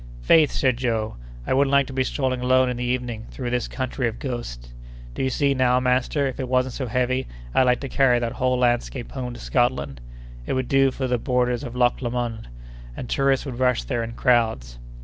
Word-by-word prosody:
"Faith!" 150 - +5
said 130 -3 +1
Joe, 115 - -2 0.3
"I - - 0
wouldn't 135 +1 +3
like 140 0 +4
to 135 - -9
be 130 0 +1
strolling 130 -1 -1
alone 130 0 +3
in 125 - -4
the 125 - -3
evening 120 -2 -3
through 125 -2 -5
this 125 -1 -1
country 130 -1 -2
of 115 0 -4
ghosts. - - -6 0.4
Do - - -4
you 130 - +1
see 140 +2 +1
now, 125 -1 +3
master, 130 +3 +1
if 130 -1 -4
it 130 -2 -3
wasn't 130 0 +1
so 130 - -4
heavy, 125 +2 0 0.3
I'd 130 - +4
like 125 0 +2
to 140 - -4
carry 130 -2 +3
that 120 -1 -1
whole 130 0 0
landscape 120 0 0
home 125 -2 -5
to - - -10
Scotland! 70 - 0 0.5
It - - -1
would 130 -1 -1
do 135 0 +4
for 130 0 -3
the 125 -1 0
borders 125 0 0
of 120 -2 -7
Loch 125 0 +2
Lomond, 120 - -3 0.5
and 125 - -5
tourists 135 +1 +1
would 130 -3 -6
rush 125 -2 +2
there 120 -4 -2
in 115 0 -6
crowds." 110 - +1
125 Hz, 215 wpm, -23 LUFS, 120-130 Hz, 0.5 s, Faith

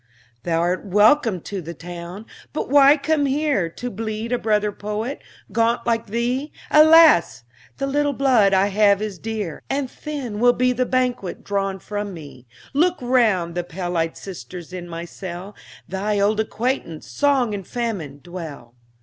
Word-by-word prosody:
Thou'rt 170 +2 0
welcome 210 - +3
to 195 +2 -5
the 170 +1 -8
town; 175 +5 -8 0.3
but 295 - -3
why 285 +1 +7
come 290 0 +1
here 275 - +1
To 245 +9 -6
bleed 220 +2 -4
a 245 - +1
brother 210 -1 +1
poet, 210 +6 -4 0.3
gaunt 230 +1 +1
like 230 -1 0
thee? 245 +7 -1 0.2
Alas! 310 - +6 0.3
the 275 - -1
little 290 +1 +1
blood 250 -7 +4
I 195 +1 +3
have 200 0 +4
is 210 -4 -5
dear, 215 -6 -4
And 270 -2 -2
thin 270 -9 -5
will 245 +1 +5
be 250 0 +2
the 250 0 0
banquet 250 -7 -1
drawn 195 -1 -1
from 205 +1 -5
me. 140 -6 -12 0.3
Look 345 +5 +2
round: 225 -9 +2
the 175 0 -2
pale 175 +1 -5
eyed 165 -1 -1
sisters 180 -2 -9
in 175 -1 -7
my 165 0 -5
cell, 185 +3 -8 0.3
Thy 200 +3 -1
old 205 +2 +2
acquaintance, 220 - -2
Song 250 - +1
and 195 -3 -5
Famine, 190 - -4
dwell. 160 -9 -8
210 Hz, 160 wpm, -22 LUFS, 180-250 Hz, 0.3 s, why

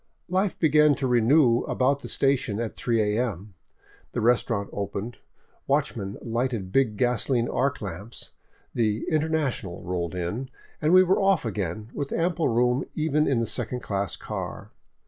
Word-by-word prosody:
Life 190 +2 0
began 150 -2 +4
to 135 - -3
renew 125 +1 +4
about 140 +2 +1
the - - -7
station 130 -6 +1
at 115 -2 -3
3 110 -3 +1
a.m. 105 -5 -3 0.6
The - - -1
restaurant 115 -3 +1
opened, 100 +3 -4 0.5
watchmen 120 -8 -1
lighted 115 -4 -2
big 120 -5 +2
gasoline 120 0 +1
arc 140 +1 0
lamps, 100 +4 -6 0.4
the 110 -2 0
" - - 0
International 155 - -1
" - - -12
rolled 90 -1 -2
in, 105 +9 -3 0.3
and 155 - +2
we 185 +1 +8
were 185 +2 +2
ofT 195 -7 +3
again, 105 0 -3
with 140 -1 -4
ample 170 0 +1
room 125 +2 +2
even 155 -1 +1
in 125 -4 +2
the - - 0
second 125 +2 -2
class 100 -2 -2
car. - - -6
120 Hz, 155 wpm, -26 LUFS, 105-140 Hz, 0.6 s, we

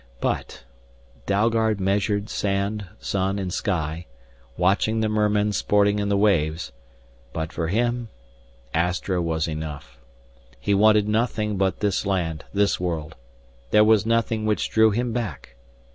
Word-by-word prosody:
But - - -3 0.6
Dalgard 110 +1 +2
measured 100 +2 0
sand, 100 0 -2
sun, 95 0 -1
and 95 -3 -3
sky, 85 -3 -2 0.5
watching 100 +5 +2
the 110 - +1
mermen 105 -1 +1
sporting 105 +1 +2
in 100 0 -1
the 100 - +2
waves 85 -8 +1 0.6
but 80 -1 -4
for 80 - -2
him 120 +4 0 0.6
Astra 90 +2 0
was 80 -1 -1
enough. 75 -6 -6 0.6
He 85 +10 0
wanted 105 +1 +4
nothing 110 -1 0
but 95 -1 0
this 100 -3 +1
land, 90 -6 -2
this 100 0 +1
world. 80 -3 -3 0.5
There 105 - +6
was 110 -1 +4
nothing 115 -1 0
which 105 - 0
drew 110 0 +5
him 120 +2 -1
back. 105 - -5
100 Hz, 130 wpm, -24 LUFS, 90-110 Hz, 0.6 s, There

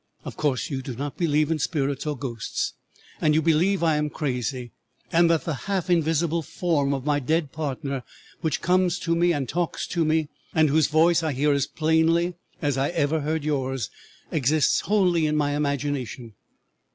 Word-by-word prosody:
Of - - -6
course 145 +1 -1
you 135 -1 -2
do 130 -1 -6
not 140 +3 -4
believe 155 -2 +1
in 160 - 0
spirits 140 -1 -1
or 150 -2 -2
ghosts, 120 -5 -3 0.5
and 150 -1 +3
you 160 - +4
believe 170 +4 +2
I 160 -2 +3
am 150 0 0
crazy, 125 -4 -3 0.4
and 170 0 +4
that 165 -2 +2
the 165 - -1 0.2
half 185 -2 0
invisible 165 0 +2
form 155 -3 0
of 135 -1 -2
my 145 -1 +2
dead 155 +1 0
partner 140 -3 -3 0.4
which 160 -4 -1
comes 180 0 +2
to 170 -3 -1
me 175 +1 +3
and 145 -5 -1
talks 175 +5 -2
to 170 - +1
me, 155 -1 +1 0.3
and 155 -2 +4
whose 155 0 +4
voice 165 +2 +4
I 160 -3 -1
hear 145 +3 +2
as 140 0 +1
plainly 160 +2 +2 0.3
as 145 -2 +1
I 135 - +1
ever 160 -2 0
heard 155 +1 -1
yours, 135 -6 -2 0.4
exists 150 +1 +2
wholly 180 -6 +2
in 150 - 0
my 145 -1 +1
imagination. 140 -5 -2
150 Hz, 180 wpm, -25 LUFS, 140-165 Hz, 0.5 s, you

